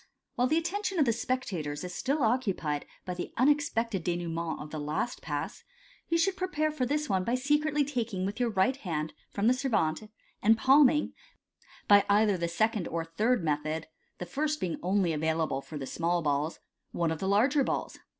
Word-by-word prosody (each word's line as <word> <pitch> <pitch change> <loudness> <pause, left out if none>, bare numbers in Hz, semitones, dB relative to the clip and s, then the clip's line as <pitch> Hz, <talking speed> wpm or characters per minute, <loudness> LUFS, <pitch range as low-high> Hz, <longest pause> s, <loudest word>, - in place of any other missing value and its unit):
— - - -57
While 250 -1 +2
the 310 +4 +2
attention 380 +3 -1
of 300 - +4
the 230 - +2
spectators 185 - -3
is 180 0 -5
still 280 - 0
occupied 195 - 0 0.2
by 180 - -3
the 175 - -5
unexpected 235 - +1
denouement 170 -1 -2
of 150 0 -8
the 155 - -4
last 150 +11 -2
Pass, - - -4 0.5
you 335 - +3
should 375 +3 +2
prepare 310 -5 -1
for 260 -5 -1
this 300 +3 0
one 190 -5 +1
by 235 +6 0
secretly 295 +2 +1
taking 235 -9 -2
with 205 +4 -4
your 245 -1 +2
right 210 +5 +2
hand 160 - -3 0.2
from 200 - -2
the 245 - +6
servante, 215 - 0 0.3
and 225 +1 +5
palming 280 +3 +5 0.7
(by 205 -1 +7
either 205 0 +4
the 170 -1 -1
second 210 +2 0
or 165 0 -3
third 215 +6 +1
method, 155 +1 -1 0.3
the 180 - -5
first 300 - -1
being 170 -3 -2
only 185 -2 +1
available 160 -2 0
for 150 - -8
the 135 - -5
small 170 +4 -1
balls) 145 +2 0 0.3
one 170 -2 0
of 160 - -3
the 190 - -2
larger 260 +8 +3
balls. - - -3
210 Hz, 190 wpm, -29 LUFS, 165-270 Hz, 0.7 s, by